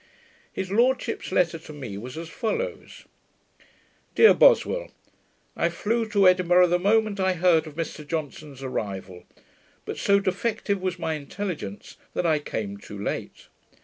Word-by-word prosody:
His 190 0 -5
lordship's 240 +1 +1
letter 170 -3 +1
to 155 - -12
me 130 -9 -7
was 125 +7 -8
as 165 0 -6
follows: 465 - -4 1.1
Dear 445 - +8
Boswell, - - +4 0.7
I - - +1
flew 225 +1 -1
to 200 -3 +4
Edinburgh 180 -1 +5
the 175 +1 +2
moment 210 +1 +2
I 190 0 +2
heard 170 -2 +3
of 150 - -10
Mr 155 -2 -5
Johnson's 150 -3 -5
arrival; 95 -7 -5 0.6
but - - -5
so 200 0 +4
defective 200 +1 -1
was 185 -1 -2
my 160 -2 -2
intelligence, 150 - -6 0.2
that - - 0
I 155 -2 +3
came 105 -8 -5
too 100 0 -10
late. 100 - -5
180 Hz, 145 wpm, -25 LUFS, 145-200 Hz, 1.1 s, Dear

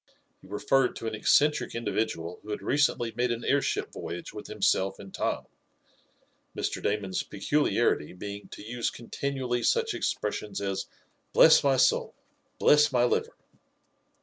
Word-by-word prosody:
He - - -16
referred 125 +6 +1
to - - -7
an 110 - -2
eccentric 150 +8 +2
individual 110 -7 -2
who 105 - -13
had 105 - -4
recently 130 -5 +1
made 125 +1 +1
an 120 0 -3
airship 140 0 0
voyage 85 - -6
with 105 - -8
himself 95 -2 +1
and 100 -1 -12
Tom, - - -2 1.1
Mr. - - -2
Damon's 100 -2 -1
peculiarity 120 - 0
being 100 +2 -8
to - - -10
use 120 +1 -2
continually 125 0 -3
such - - +1
expressions 105 -2 -3
as: 100 -1 -3 0.5
"Bless - - +7
my 135 -2 +3
soul! - - +2 0.4
Bless 150 0 +5
my 125 -2 +3
liver!" 125 - 0
115 Hz, 140 wpm, -28 LUFS, 100-130 Hz, 1.1 s, Bless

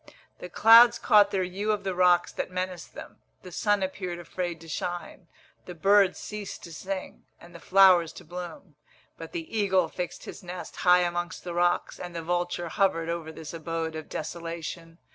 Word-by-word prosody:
The 180 - -8
clouds 230 +5 +7
caught 210 -3 +5
their 190 -2 0
hue 195 +4 -2
of 210 -1 -2
the 190 -1 -2
rocks 180 -1 +3
that - - -4
menaced 180 -2 -5
them. - - -11 0.2
The 180 - -10
sun 205 +2 +1
appeared 185 -2 -4
afraid 175 0 -5
to 165 - -12
shine, 175 +2 -5 0.4
the 180 - -7
birds 195 +2 +4
ceased 210 -2 -7
to 170 - -10
sing, 190 +4 -6
and 170 0 -15
the 170 - -10
flowers 185 -3 +5
to 180 - -12
bloom; 175 0 -8 0.5
but 165 -1 -8
the 165 +6 -6
eagle 190 -5 +2
fixed 180 +1 -5
his - - -9
nest 180 0 -8
high 180 0 +5
amongst 175 0 -3
the 175 - -5
rocks, 175 0 0
and 175 -1 -7
the 165 - -4
vulture 175 0 -2
hovered 165 -3 +1
over 170 -2 -4
this 160 0 -9
abode 165 0 -4
of 155 -1 -7
desolation. 165 0 -6
175 Hz, 180 wpm, -27 LUFS, 170-190 Hz, 0.5 s, clouds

